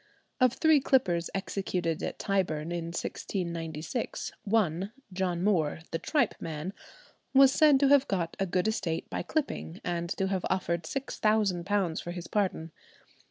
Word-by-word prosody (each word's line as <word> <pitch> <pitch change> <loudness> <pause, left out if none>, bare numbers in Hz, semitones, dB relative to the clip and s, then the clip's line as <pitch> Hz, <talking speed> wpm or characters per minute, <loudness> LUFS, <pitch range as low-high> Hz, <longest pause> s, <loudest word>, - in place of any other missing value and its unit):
Of 255 -2 +4
three 315 0 +4
clippers 185 -12 +2
executed 180 -4 -2
at - - -3
Tyburn 170 -5 -1
in 170 -1 -2
1696, 170 - -4
one, 195 -3 +1 0.2
John 180 -2 -1
Moore, 160 -7 +1
"the 165 - -1
tripe 300 -3 +1
man," 160 +3 -5 0.6
was 270 0 +8
said 295 -1 +5
to 280 - +5
have 280 -1 +5
got 175 -4 -1
a 195 - +1
good 180 +3 +1
estate 175 -7 -1
by - - -2
clipping, 270 - -3
and 170 -1 -2
to 190 - +1
have 190 -2 -1
offered 170 -3 -1
£6,000 205 -6 0
for - - -7
his 175 -1 -6
pardon. 185 -6 -1
185 Hz, 145 wpm, -29 LUFS, 170-215 Hz, 0.6 s, was